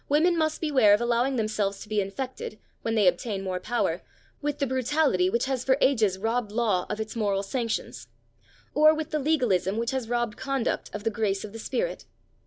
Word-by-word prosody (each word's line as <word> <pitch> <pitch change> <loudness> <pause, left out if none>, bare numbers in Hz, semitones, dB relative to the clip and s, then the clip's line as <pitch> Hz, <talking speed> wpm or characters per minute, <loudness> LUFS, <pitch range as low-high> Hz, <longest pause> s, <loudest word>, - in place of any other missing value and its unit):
Women 325 +5 +4
must 315 -1 0
beware 260 -10 +5
of 210 - -4
allowing 240 +3 +1
themselves 215 -3 -1
to - - -9
be 210 -1 +1
infected, 215 +3 -5 0.2
when 225 0 -1
they 210 -3 +3
obtain 195 +3 0
more 185 -1 -2
power, 240 +6 -1 0.4
with 295 -1 -2
the 280 - 0
brutality 260 -7 +2
which 235 +5 0
has 265 -2 -1
for 265 0 +3
ages 220 -8 +3
robbed 225 +1 -1
law 210 -5 +1
of 210 - -3
its 220 +1 -4
moral 200 -3 0
sanctions, 230 +2 -3 0.7
or 310 +1 +6
with 310 -1 -4
the 305 - 0
legalism 245 - +1
which 235 +2 -1
has 260 -4 -3
robbed 240 -3 -1
conduct 265 -2 -2
of 210 - -6
the 225 - 0
grace 205 -3 -1
of 210 -1 -8
the 225 - -7
spirit. - - -3
230 Hz, 195 wpm, -27 LUFS, 210-270 Hz, 0.7 s, or